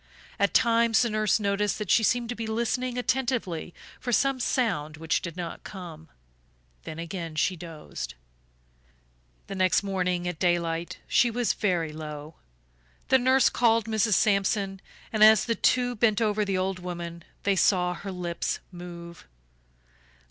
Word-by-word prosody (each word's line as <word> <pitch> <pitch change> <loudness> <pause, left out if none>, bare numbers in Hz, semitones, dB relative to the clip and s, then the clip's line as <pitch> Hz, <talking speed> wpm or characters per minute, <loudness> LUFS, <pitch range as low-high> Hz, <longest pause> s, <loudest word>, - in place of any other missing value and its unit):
At 200 - +1
times 230 -1 +4
the 235 - -1
nurse 215 0 +2
noticed 200 0 0
that 210 -4 -3
she - - +5
seemed 235 +1 +1
to 245 - -3
be 225 -1 -4
listening 240 +3 -1
attentively 245 -10 -1 0.3
for 245 - -3
some 270 +2 +2
sound 175 - -1
which 160 +1 0
did 170 0 -7
not 170 -2 -6
come; 165 -5 -9 0.8
then 155 - -7
again 165 -1 -5
she 185 +4 +1
dozed. 155 - -8 1.3
The - - -7
next 185 +1 +2
morning 180 -2 -1
at 180 -3 -4
daylight 170 -2 0
she 240 - +4
was 240 0 0
very 170 -6 -1
low. 150 0 -7 0.8
The 265 - +6
nurse 260 +1 +4
called 230 -2 +3
Mrs. 220 -2 +2
Sampson 195 -1 +1 0.3
and 215 -1 +4
as 220 -1 +7
the 230 - +1
two 245 +1 +2
bent 215 -1 +2
over 215 -2 +1
the 195 -2 -1
old 185 0 -1
woman 170 -2 -6 0.2
they 200 -1 +2
saw 180 -1 +3
her 195 +2 -7
lips 175 -2 -3
move. 170 -1 -10
195 Hz, 150 wpm, -27 LUFS, 170-230 Hz, 1.3 s, as